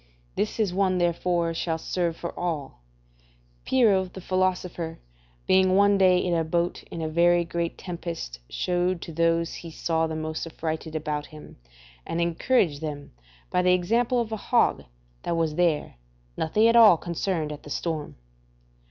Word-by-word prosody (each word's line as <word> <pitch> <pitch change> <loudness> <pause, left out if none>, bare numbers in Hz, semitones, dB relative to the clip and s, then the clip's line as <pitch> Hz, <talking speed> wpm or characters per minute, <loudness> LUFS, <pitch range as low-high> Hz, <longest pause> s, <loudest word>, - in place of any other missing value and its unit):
This 210 -2 -1
one 185 -1 +2
therefore 175 -1 0
shall 165 0 -2
serve 170 0 -2
for 170 - -5
all: 160 - -4 0.9
Pyrrho 215 -7 +3
the 185 +1 -10
philosopher 180 -3 -1 0.5
being 185 0 +4
one 200 0 +4
day 185 -1 +5
in 180 -1 0
a 165 -1 +2
boat 170 +2 -1
in 165 - -5
a - - -1
very 170 +2 +3
great 170 0 -3
tempest, 170 - -6
shewed 180 0 0
to - - -8
those 165 +1 +1
he 170 - -8
saw 160 0 -1
the 160 - -4
most 155 +1 -4
affrighted 160 0 -4
about 150 -1 -3
him, 155 -1 -13 0.5
and 165 - -3
encouraged 170 - +1
them, 145 -2 -6 0.4
by 180 - +2
the 180 0 +4
example 230 +8 +1
of 230 -2 -2
a 220 - -2
hog - - +1 0.4
that 170 - -2
was 160 -2 0
there, 165 - 0 0.4
nothing 210 +8 +2
at 230 - +4
all 220 -7 +8
concerned 170 -2 -2
at 150 - -7
the - - -12
storm. 155 0 -3
170 Hz, 160 wpm, -26 LUFS, 160-185 Hz, 0.9 s, all